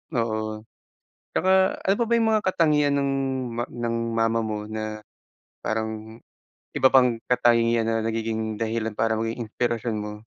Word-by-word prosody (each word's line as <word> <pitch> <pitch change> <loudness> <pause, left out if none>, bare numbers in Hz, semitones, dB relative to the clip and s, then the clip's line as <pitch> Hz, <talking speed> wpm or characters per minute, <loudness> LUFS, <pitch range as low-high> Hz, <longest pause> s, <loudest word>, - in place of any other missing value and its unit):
Oo, 110 -2 -2 0.7
tsaka 185 - +1 0.3
ano 195 - +3
pa - - +4
ba - - -1
yung 225 -1 +2
mga 215 -1 +1
katangian 150 -5 +3
ng 140 0 +1 0.5
ma 120 - 0
ng 120 -1 -3 0.2
mama 115 0 +2
mo 110 -1 -3
na 110 0 -4 0.7
parang 110 +1 -4 0.6
iba 130 - +5
pang 125 -3 +5
katangian 115 -2 +3
na 115 -1 0
nagiging 110 -1 -2
dahilan 110 -1 -1
para 110 +1 0
maging 115 +2 -3
inspirasyon 115 0 -1
mo? 105 0 -5
115 Hz, 145 wpm, -25 LUFS, 110-120 Hz, 0.7 s, iba